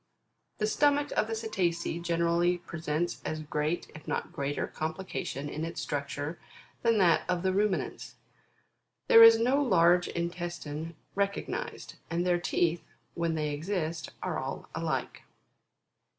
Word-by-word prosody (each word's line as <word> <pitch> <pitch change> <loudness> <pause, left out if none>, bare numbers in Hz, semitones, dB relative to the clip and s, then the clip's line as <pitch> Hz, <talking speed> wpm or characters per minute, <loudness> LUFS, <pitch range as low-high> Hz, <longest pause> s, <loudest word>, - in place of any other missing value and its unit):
The 215 - 0
stomach 290 +5 +2
of 215 - +1
the 225 - -2
Cetacea 175 -6 -1
generally 170 +1 +2
presents 170 -1 -3
as 155 0 -3
great, 150 +3 -2
if 155 - -12
not - - -2
greater, 140 +1 -2
complication 160 -3 -4
in 155 +2 -4
its 165 +1 -4
structure, 145 +2 -3 0.4
than 230 -1 +3
that 175 -5 +5
of 180 -1 0
the 190 0 +2
Ruminants. 205 0 -1 0.9
There 230 - +9
is 230 0 +10
no 255 +5 +3
large 175 -7 +4
intestine 170 -2 -4 0.2
recognised, 200 0 -3
and 170 +1 0
their 175 -1 +3
teeth, 170 -1 +1 0.3
when 170 -1 -1
they 150 -1 -1
exist, 160 0 -3
are - - -1
all - - -5
alike. - - -2
170 Hz, 135 wpm, -30 LUFS, 160-195 Hz, 0.9 s, is